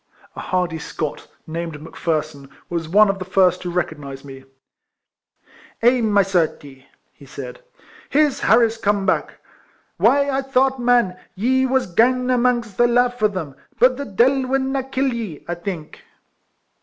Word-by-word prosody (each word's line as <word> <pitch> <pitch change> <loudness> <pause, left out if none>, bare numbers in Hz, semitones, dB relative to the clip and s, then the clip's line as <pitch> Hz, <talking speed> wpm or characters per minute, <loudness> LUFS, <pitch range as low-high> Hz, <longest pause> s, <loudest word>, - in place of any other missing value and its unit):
A - - -7
hardy 180 -3 -2
Scot, 155 -2 -5 0.2
named 165 -1 -5
Mc 155 - -12
Pherson, 155 -4 -3 0.2
was 165 -2 -3
one 210 +4 +6
of 195 0 -1
the - - -4
first 185 -1 +2
who 180 - -4
recognised 150 -6 -4
me. 135 -1 -11 0.7
" - - -29
Eh, 245 +1 +4
my 205 -3 +3
certie," 155 -7 -2 0.3
he - - -17
said, - - -9 0.2
" - - -23
here's 295 -1 +2
Harris 230 -1 +3
come 205 -2 0
back. - - 0 0.6
Why 280 0 +3
I 275 -1 0
thought, 265 0 +1
man, 240 -7 +2 0.2
ye 260 +6 +1
was 260 0 +1
gane 250 +7 +2
amangst 240 -4 +1
the 240 - +5
lave 245 0 +1
o' 215 - +5
them, 185 -9 -5 0.2
but 255 +1 +4
the 280 +2 -5
deil 260 +5 +2
will 270 +1 +1
na 270 0 -1
kill 265 0 -1
ye, 215 -10 -6
I 175 - -2
think 175 -3 -7
205 Hz, 165 wpm, -21 LUFS, 170-255 Hz, 0.7 s, one